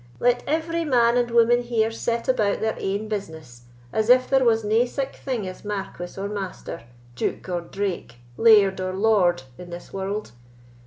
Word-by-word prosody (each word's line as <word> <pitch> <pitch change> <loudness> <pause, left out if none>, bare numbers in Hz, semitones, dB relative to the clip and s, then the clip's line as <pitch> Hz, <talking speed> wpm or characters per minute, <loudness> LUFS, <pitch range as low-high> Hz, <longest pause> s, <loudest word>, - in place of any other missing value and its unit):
"Let 245 0 +2
every 330 +3 -1
man 240 -5 +3
and 245 -1 +1
woman 235 +1 +4
here 230 -2 0
set 230 +1 -2
about 215 -6 +1
their 220 0 0
ain 200 +3 -2
business, 160 - -7 0.3
as 220 +1 0
if 255 +1 +6
there 270 -1 +3
was 225 -2 +3
nae 220 +3 +3
sic 270 +2 -4
thing 245 -8 -4
as 185 - -9
marquis 195 -3 -5
or 200 - -2
master, 195 - -6 0.3
duke 125 - -3
or 175 -1 -2
drake, 185 -8 -4 0.2
laird 200 - +5
or 185 0 -2
lord, 190 -6 +2 0.2
in 180 -1 -9
this 175 0 -9
world. 195 +2 -4
215 Hz, 170 wpm, -24 LUFS, 190-240 Hz, 0.3 s, if